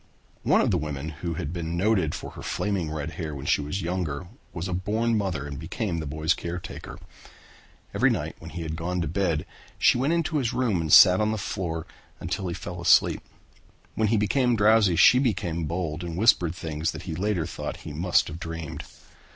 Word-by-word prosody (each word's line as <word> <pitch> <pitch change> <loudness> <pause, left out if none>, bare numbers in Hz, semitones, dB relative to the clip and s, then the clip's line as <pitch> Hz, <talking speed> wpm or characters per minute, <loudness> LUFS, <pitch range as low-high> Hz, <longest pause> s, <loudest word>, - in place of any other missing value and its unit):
One - - +3
of - - +1
the 90 - +2
women 75 -1 -4
who 85 +2 -5
had 80 -2 -4
been 85 -1 -3
noted 95 -5 +2
for - - -7
her - - -10
flaming 100 -6 -2
red 75 0 -4
hair 80 -4 -5
when 70 0 -7
she - - +2
was 75 +7 -3
younger 85 -2 -3 0.2
was 85 +2 -4
a 90 - -3
born 110 +6 0
mother 95 -8 -1
and 70 -1 -6
became 85 +2 -3
the 80 - -5
boy's 80 +3 +1
caretaker. 85 -1 -7 1.0
Every - - +3
night - - -2
when - - -9
he 85 -2 -6
had 80 0 -4
gone 90 +2 -2
to 85 - -1
bed 85 -2 0 0.3
she - - +4
went 140 +6 +2
into 165 -2 0
his 125 -4 0
room 115 -9 +1
and 80 -2 -3
sat 90 +4 +8
on 105 - +2
the 110 - -1
floor 85 -5 -3 0.3
until 95 - -3
he 85 - -3
fell - - -7
asleep. - - +4 0.7
When 110 - +1
he 110 +2 +2
became 120 +4 +2
drowsy 105 -3 +4
she 125 +9 +7
became 90 - -1
bold 85 0 -3
and 85 -1 -5
whispered 90 -6 +3
things 80 -1 -3
that - - -8
he 85 - -5
later 90 -1 -1
thought 85 - -5
he 75 - -6
must 85 +4 +2
have 80 - -7
dreamed. 80 -2 -6
85 Hz, 205 wpm, -26 LUFS, 80-100 Hz, 1.0 s, sat